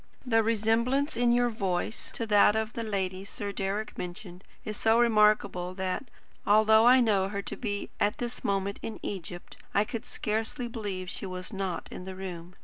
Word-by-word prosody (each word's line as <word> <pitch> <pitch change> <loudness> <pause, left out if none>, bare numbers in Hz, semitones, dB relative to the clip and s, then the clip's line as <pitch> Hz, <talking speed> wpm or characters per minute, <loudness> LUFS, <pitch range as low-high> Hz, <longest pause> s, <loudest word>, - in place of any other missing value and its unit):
The 225 -3 +4
resemblance 230 +6 +1
in 240 0 +3
your 240 0 +3
voice 195 0 -2
to 230 - -2
that 210 -1 +5
of 220 +1 -1
the 230 - -3
lady 190 -3 -2
Sir 200 0 -5
Deryck 200 +2 -3
mentioned 180 +1 -7 0.2
is 215 - -4
so 225 +2 +3
remarkable 210 -5 +3
that, 190 +6 -3 0.3
although 220 +2 +6
I 255 +1 +8
know 200 -5 +3
her 200 0 -3
to - - -4
be 205 -4 -4
at 210 +4 +1
this 240 0 -5
moment 200 0 -1
in 225 - -6
Egypt, 175 -2 -6 0.2
I 205 - +5
could 230 +2 -6
scarcely 220 +4 -2
believe 205 -6 -5
she 190 - -5
was 185 +3 -6
not 190 -3 -3
in 180 - -7
the 190 0 -6
room. 180 -2 -7
210 Hz, 180 wpm, -29 LUFS, 190-225 Hz, 0.3 s, I